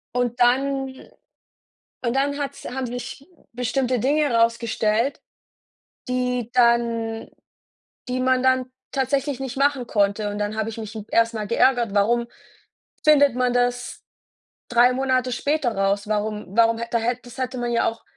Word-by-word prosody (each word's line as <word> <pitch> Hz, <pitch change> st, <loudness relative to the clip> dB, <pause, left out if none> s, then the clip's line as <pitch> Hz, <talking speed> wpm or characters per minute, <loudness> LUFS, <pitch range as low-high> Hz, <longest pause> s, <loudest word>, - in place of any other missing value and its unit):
Und 245 Hz, -1 st, -1 dB
dann 265 Hz, +2 st, +1 dB, 1.0 s
und 235 Hz, 0 st, 0 dB
dann 285 Hz, +1 st, 0 dB
hat's 280 Hz, -1 st, -5 dB
haben 260 Hz, 0 st, -3 dB
sich 245 Hz, +4 st, -7 dB, 0.2 s
bestimmte 250 Hz, +1 st, -1 dB
Dinge 290 Hz, +4 st, +1 dB
rausgestellt, 230 Hz, +1 st, +1 dB, 0.9 s
die 250 Hz, -2 st, -1 dB
dann 235 Hz, -2 st, +1 dB, 0.8 s
die 250 Hz, 0 st, -2 dB
man 255 Hz, 0 st, +2 dB
dann 260 Hz, 0 st, +3 dB, 0.3 s
tatsächlich 275 Hz, 0 st, -1 dB
nicht 265 Hz, -1 st, -5 dB
machen 275 Hz, -3 st, +1 dB
konnte. 205 Hz, 0 st, +1 dB
Und 205 Hz, -, -5 dB
dann 210 Hz, +1 st, -2 dB
habe 220 Hz, 0 st, -2 dB
ich 225 Hz, -, -8 dB
mich 215 Hz, -2 st, -7 dB
m 215 Hz, -2 st, -6 dB
erst 230 Hz, 0 st, +2 dB
mal 215 Hz, -2 st, -4 dB
geärgert: 235 Hz, -2 st, +2 dB
„Warum 235 Hz, +4 st, +2 dB, 0.8 s
findet 285 Hz, -3 st, +6 dB
man 250 Hz, 0 st, +1 dB
das 245 Hz, 0 st, -1 dB, 0.7 s
3 245 Hz, +1 st, +5 dB
Monate 255 Hz, -1 st, 0 dB
später 275 Hz, -3 st, 0 dB
raus? 200 Hz, +1 st, 0 dB
Warum 210 Hz, 0 st, -2 dB
warum 230 Hz, 0 st, +4 dB
hätt 235 Hz, 0 st, -5 dB
da -, -, +4 dB
hätt 240 Hz, +2 st, -2 dB
das 245 Hz, +1 st, -12 dB
hätte 255 Hz, -1 st, -3 dB
man 240 Hz, 0 st, -2 dB
ja 235 Hz, -, +2 dB
auch 225 Hz, 0 st, -11 dB
245 Hz, 150 wpm, -23 LUFS, 230-260 Hz, 1.0 s, findet